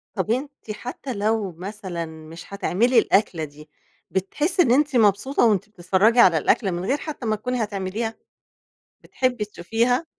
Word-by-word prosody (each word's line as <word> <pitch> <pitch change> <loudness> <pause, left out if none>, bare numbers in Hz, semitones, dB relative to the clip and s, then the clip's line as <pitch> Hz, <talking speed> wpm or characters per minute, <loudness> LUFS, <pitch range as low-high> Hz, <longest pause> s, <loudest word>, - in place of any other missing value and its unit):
طب 200 +3 -1
أنتِ 275 -2 -4
حتى 250 +4 -6
لو 210 -1 0
مثلًا 185 -1 -6
مش 160 +3 -11
هتعملي 220 +5 +3
الأكلة 195 -5 +1
دي، 150 +1 -10 0.4
بتحسي 295 - 0
إن 250 - +3
أنتِ 290 +2 +3
مبسوطة 225 +4 +3
وأنتِ 210 -2 +2
بتتفرجي 195 +4 +2
على 180 -8 +7
الأكلة 195 - +2
من 175 +1 -3
غير 270 +7 +1
حتى 295 -4 -7
ما 215 -1 +1
تكوني 250 +4 -3
هاتعمليها؟ 205 +2 -3 0.9
بتحبي 250 -4 -1
تشوفيها؟ 230 - 0
210 Hz, 145 wpm, -23 LUFS, 185-245 Hz, 0.9 s, على